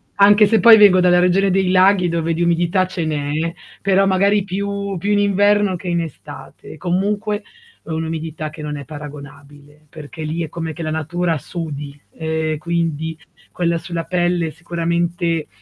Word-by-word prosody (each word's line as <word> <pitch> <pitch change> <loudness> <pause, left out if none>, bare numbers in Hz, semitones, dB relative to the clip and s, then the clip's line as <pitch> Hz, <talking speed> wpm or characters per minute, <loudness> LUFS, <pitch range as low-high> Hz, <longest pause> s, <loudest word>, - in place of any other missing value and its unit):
anche 205 +1 +6
se 220 +2 +3
poi 230 -2 +9
vengo 200 -3 +7
dalla 180 0 +4
regione 185 +2 +3
dei 190 -1 +1
laghi, 185 -1 +4
dove 165 0 -1
di 170 - -3
umidità 175 +2 +1
ce 180 -3 -4
n'è, 155 +2 -2 0.3
però 195 0 +3
magari 200 +1 +2
più 200 0 -3
più 205 +5 -2
in 205 - +3
inverno 205 -1 +2
che 180 - -9
in 170 -1 0
estate, 160 - -10
e - - -13
comunque 205 +5 -1 0.4
un'umidità 160 -1 -4
che 155 0 -11
non 150 0 -4
è 145 - -6
paragonabile, 145 0 -12
perché 155 +1 -9
lì 160 +2 -3
è 155 - -6
come 165 0 -5
che 165 - -7
la 155 - -3
natura 165 +2 -1
sudi 145 -2 -7
e 160 -1 -2
quindi, 160 -1 -2 0.4
quella 170 -1 0
sulla 170 0 -5
pelle 175 -1 0
sicuramente 170 0 -2
170 Hz, 165 wpm, -19 LUFS, 160-190 Hz, 0.4 s, poi